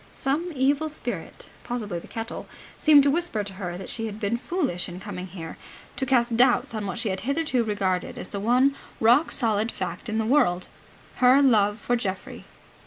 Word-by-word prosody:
Some 315 +6 -1
evil 280 +4 +2
spirit, 405 +10 -5
possibly 210 -7 -4
the - - -13
kettle, 225 +1 -6 0.3
seemed 295 -2 +6
to 280 - +3
whisper 325 -9 0
to 200 -1 -7
her 180 -2 -5
that 190 - -6
she 225 -1 -3
had 210 0 -7
been 215 +1 0
foolish 265 - -2
in 175 +1 -8
coming 185 -2 -6
here, 165 -3 -8 0.4
to 265 - -2
cast 240 -3 +2
doubts 245 0 +3
on 215 -2 -3
what 190 - -4
she 230 -2 -1
had 190 0 -2
hitherto 275 +2 0
regarded 195 -4 -1
as - - -7
the 200 - -4
one 250 +6 +3 0.3
rock 245 +8 +4
solid 225 -2 +1
fact - - -5
in 220 - -1
the 220 - 0
world, 220 -9 +2 0.5
her 255 +2 +6
love 215 -7 +4
for 245 - 0
Geoffrey. 195 -5 -5
230 Hz, 190 wpm, -25 LUFS, 200-270 Hz, 0.5 s, seemed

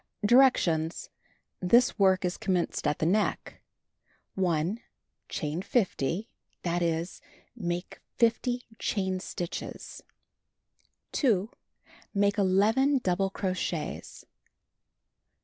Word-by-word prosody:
Directions: 190 -10 +3 0.6
Tills 245 +1 +5
work 190 -1 +4
is 180 - -1
commenced 180 -2 -1
at 150 - +1
the - - -1
neck. 205 +6 0 0.7
1. 180 +2 0 0.5
Chain 155 0 -3
50; 190 - 0 0.4
that 175 0 0
is, 170 +1 -1 0.3
make 175 -5 -4 0.2
50 245 +1 +1
chain 190 -2 -1
stitches. 175 -2 -6 1.1
2. 220 -5 +1 0.6
Make 200 +1 +2
11 215 +9 +3
double 190 +1 +1
crochets. 185 -5 -4
190 Hz, 85 wpm, -28 LUFS, 175-220 Hz, 1.1 s, Tills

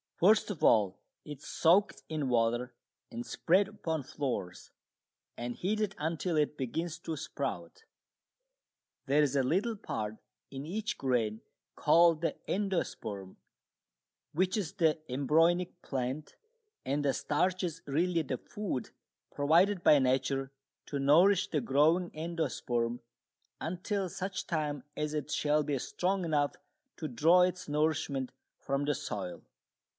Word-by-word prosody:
First 215 +6 +4
of 180 - -7
all 100 -4 +4 0.3
it 150 -3 -7
is - - -15
soaked 180 +5 +3
in 155 -3 -1
water 120 +1 +1 0.4
and 120 +1 -5
spread 185 +3 +2
upon 165 -7 -3
floors 120 -10 -4 0.7
and 120 0 -4
heated 210 +1 -1
until 165 +2 -1
it 150 0 +1
begins 160 +6 -3
to 165 -2 -4
sprout. 450 - -5 1.2
There 145 +2 +3
is 145 -2 +1
a 135 - +3
little 195 - +1
part 110 - -4 0.3
in 135 +1 -6
each 210 +6 -3
grain 115 -5 0 0.3
called 170 -1 +5
the 170 - 0
endosperm, 170 - -2 0.9
which 185 +6 +1
is 190 -4 -2
the 160 -6 +2
embryonic 165 +7 +2
plant, 135 +3 -3 0.5
and 145 +2 -1
the 135 - +3
starch 180 +5 0
is 165 -3 -3
really 165 +4 +1
the 130 -3 -3
food 200 - -4 0.4
provided 170 +6 +3
by 150 - +7
nature 135 +1 +1 0.4
to 140 - -3
nourish 180 +8 +5
the 150 - 0
growing 155 +8 +3
endosperm 130 -7 -2 0.6
until 185 +3 -2
such 190 +3 -4
time 150 -5 -2
as 150 0 -2
it 150 -1 -3
shall 150 0 +2
be 145 -1 -1
strong 185 +7 -1
enough 145 -3 +1 0.4
to 155 - -4
draw 160 +8 +5
its 180 0 +1
nourishment 145 -3 0 0.3
from 140 +1 -1
the 145 0 +1
soil. 100 -7 -5
150 Hz, 130 wpm, -31 LUFS, 135-180 Hz, 1.2 s, by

